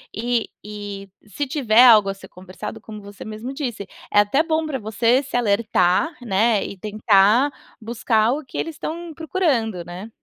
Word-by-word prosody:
e 235 Hz, +1 st, -1 dB
e 205 Hz, -2 st, -8 dB, 0.2 s
se 250 Hz, +8 st, -3 dB
tiver 255 Hz, -5 st, +4 dB
algo 215 Hz, -4 st, +7 dB
a 195 Hz, -, -1 dB
ser 195 Hz, -1 st, -14 dB
conversado, 190 Hz, +4 st, -9 dB
como 215 Hz, 0 st, -10 dB
você 200 Hz, 0 st, -11 dB
mesmo 220 Hz, +5 st, -6 dB
disse, 245 Hz, -8 st, -4 dB, 0.2 s
é 205 Hz, -, +4 dB
até 205 Hz, +8 st, +3 dB
bom 320 Hz, -1 st, -1 dB
pra 290 Hz, -4 st, -3 dB
você 230 Hz, +4 st, +1 dB
se 260 Hz, -, -7 dB
alertar, 215 Hz, -, +2 dB
né, 220 Hz, -1 st, +1 dB
e 200 Hz, -, -7 dB
tentar 215 Hz, +5 st, +3 dB, 0.3 s
buscar 225 Hz, 0 st, +1 dB
o 290 Hz, +2 st, -3 dB
que 250 Hz, -, -9 dB
eles 325 Hz, -1 st, -3 dB
estão 335 Hz, +3 st, -6 dB
procurando, 275 Hz, -, -1 dB
né? 180 Hz, +6 st, -9 dB
220 Hz, 170 wpm, -21 LUFS, 205-260 Hz, 0.3 s, algo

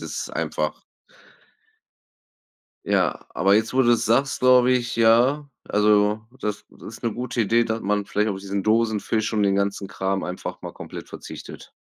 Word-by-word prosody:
ist -, -, -5 dB
einfach -, -, -3 dB, 2.0 s
Ja, -, -, 0 dB
aber 100 Hz, +1 st, +3 dB
jetzt, 110 Hz, +4 st, +1 dB
wo 130 Hz, -, +4 dB
du's 120 Hz, -2 st, +3 dB
sagst, 135 Hz, +5 st, +1 dB
glaube 125 Hz, 0 st, +5 dB
ich, 120 Hz, -2 st, -1 dB
ja, 120 Hz, +6 st, +4 dB, 0.2 s
also, 105 Hz, 0 st, +3 dB, 0.2 s
das 105 Hz, 0 st, -3 dB, 0.2 s
ist 110 Hz, -, -11 dB
'ne 115 Hz, -3 st, -1 dB
gute 125 Hz, 0 st, -2 dB
Idee, 115 Hz, +3 st, +3 dB
dass 115 Hz, 0 st, -2 dB
man 105 Hz, 0 st, 0 dB
vielleicht 105 Hz, +1 st, 0 dB
auf 95 Hz, -, -4 dB
diesen 100 Hz, 0 st, -3 dB
Dosenfisch 110 Hz, 0 st, 0 dB
und 105 Hz, -, +2 dB
den 100 Hz, -1 st, +2 dB
ganzen 100 Hz, 0 st, -1 dB
Kram 95 Hz, 0 st, -2 dB
einfach 90 Hz, +1 st, -6 dB
mal -, -, -7 dB
komplett -, -, -9 dB
verzichtet. -, -, -10 dB
110 Hz, 155 wpm, -23 LUFS, 105-120 Hz, 2.0 s, glaube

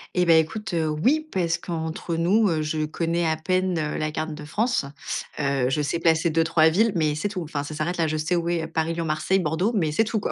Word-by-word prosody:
Eh, 180 Hz, -, +3 dB
bah, 165 Hz, -1 st, +6 dB
écoute, 175 Hz, +5 st, 0 dB
heu, 160 Hz, -2 st, +1 dB
oui, 270 Hz, -, +1 dB
parce 170 Hz, -2 st, 0 dB
qu'entre 165 Hz, 0 st, -4 dB
nous, 195 Hz, +7 st, +3 dB
heu, 160 Hz, -2 st, 0 dB
je 155 Hz, 0 st, -1 dB
connais 165 Hz, +2 st, -1 dB
à 160 Hz, -1 st, +2 dB
peine, 185 Hz, +1 st, 0 dB
heu, 150 Hz, -1 st, -2 dB
la 155 Hz, 0 st, -2 dB
carte 155 Hz, 0 st, -3 dB
de 150 Hz, -1 st, -9 dB
France. 220 Hz, -, 0 dB, 0.5 s
Heu, 140 Hz, -3 st, +1 dB
je 150 Hz, -, +1 dB
sais 145 Hz, +3 st, -1 dB
placer 165 Hz, 0 st, +3 dB
2-3 160 Hz, 0 st, +3 dB
villes, 210 Hz, +7 st, +3 dB
mais 155 Hz, -3 st, +1 dB
c'est 180 Hz, +7 st, -2 dB
tout. 185 Hz, -3 st, -4 dB
Enfin, 150 Hz, -3 st, -4 dB
ça 155 Hz, -, -7 dB
s'arrête 165 Hz, +4 st, -2 dB
là. 165 Hz, -, +2 dB
Je 155 Hz, 0 st, -1 dB
sais 160 Hz, +4 st, 0 dB
où 170 Hz, 0 st, -1 dB
est 170 Hz, -2 st, -1 dB
Paris, 165 Hz, 0 st, -1 dB
Lyon, 165 Hz, 0 st, -3 dB
Marseille, 155 Hz, +5 st, +1 dB
Bordeaux, 180 Hz, +7 st, 0 dB
mais 160 Hz, -7 st, +1 dB
c'est 225 Hz, -, +3 dB
tout, 220 Hz, 0 st, -1 dB
quoi. -, -, -2 dB
165 Hz, 250 wpm, -24 LUFS, 155-180 Hz, 0.5 s, bah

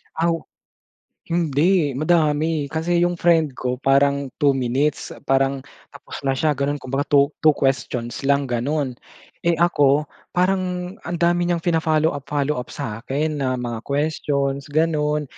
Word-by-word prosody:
Aw. 165 Hz, 0 st, +1 dB, 0.9 s
Hindi, 165 Hz, -2 st, +1 dB
madami. 155 Hz, -1 st, +1 dB
Kasi 165 Hz, +3 st, 0 dB
yung 175 Hz, 0 st, +2 dB
friend 165 Hz, -6 st, +2 dB
ko 125 Hz, 0 st, -3 dB
parang 140 Hz, 0 st, +2 dB, 0.2 s
2 140 Hz, -, +6 dB
minutes. 135 Hz, +3 st, 0 dB, 0.2 s
Parang 135 Hz, 0 st, +1 dB, 0.2 s
tapos 140 Hz, 0 st, -10 dB
na 135 Hz, -1 st, 0 dB
siya 150 Hz, +3 st, +1 dB
ganun 140 Hz, +1 st, -1 dB
kumbaga 135 Hz, 0 st, -3 dB
2- 140 Hz, 0 st, +4 dB
2 155 Hz, -2 st, +4 dB
questions 135 Hz, -1 st, -2 dB
lang, 140 Hz, 0 st, +3 dB
ganun. 135 Hz, +3 st, -1 dB, 0.5 s
Eh, 170 Hz, 0 st, +1 dB
ako 150 Hz, -4 st, +3 dB, 0.3 s
parang 180 Hz, -1 st, 0 dB, 0.2 s
ang 175 Hz, -, -2 dB
dami 175 Hz, +1 st, +2 dB
niyang 170 Hz, -2 st, -1 dB
fina-follow-up 160 Hz, -4 st, +1 dB
follow-up 145 Hz, -3 st, -1 dB
sakin 140 Hz, +8 st, -3 dB
na 130 Hz, -1 st, 0 dB
mga 120 Hz, -2 st, -4 dB
questions, 140 Hz, -1 st, -1 dB
ganun. 150 Hz, -1 st, +1 dB
145 Hz, 135 wpm, -22 LUFS, 135-165 Hz, 0.9 s, 2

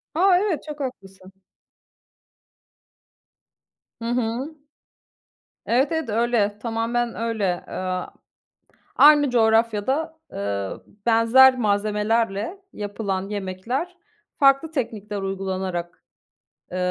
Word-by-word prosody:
A! 365 Hz, +2 st, +5 dB
Evet, 395 Hz, -7 st, -1 dB
çok 300 Hz, -1 st, -8 dB
haklısın. 195 Hz, -8 st, -7 dB, 2.7 s
Hı -, -, -5 dB
hı. 245 Hz, +5 st, -2 dB, 1.1 s
Evet, 260 Hz, +6 st, +2 dB
evet 320 Hz, -6 st, -2 dB
öyle, 220 Hz, -2 st, +1 dB
tamamen 230 Hz, +1 st, -1 dB
öyle. 215 Hz, -5 st, -1 dB
Eee, 185 Hz, -1 st, -3 dB, 0.9 s
aynı 290 Hz, -2 st, +7 dB
coğrafyada, 230 Hz, +7 st, +1 dB
eee, 100 Hz, -1 st, -3 dB, 0.4 s
benzer 240 Hz, +3 st, +6 dB
malzemelerle 210 Hz, -, 0 dB
yapılan 200 Hz, -2 st, -4 dB
yemekler, 210 Hz, -, -4 dB, 0.4 s
farklı 275 Hz, +3 st, +4 dB
teknikler 210 Hz, -8 st, -4 dB
uygulanarak, 190 Hz, -2 st, -4 dB, 0.7 s
eee, 180 Hz, -, -4 dB
225 Hz, 80 wpm, -23 LUFS, 200-265 Hz, 2.7 s, aynı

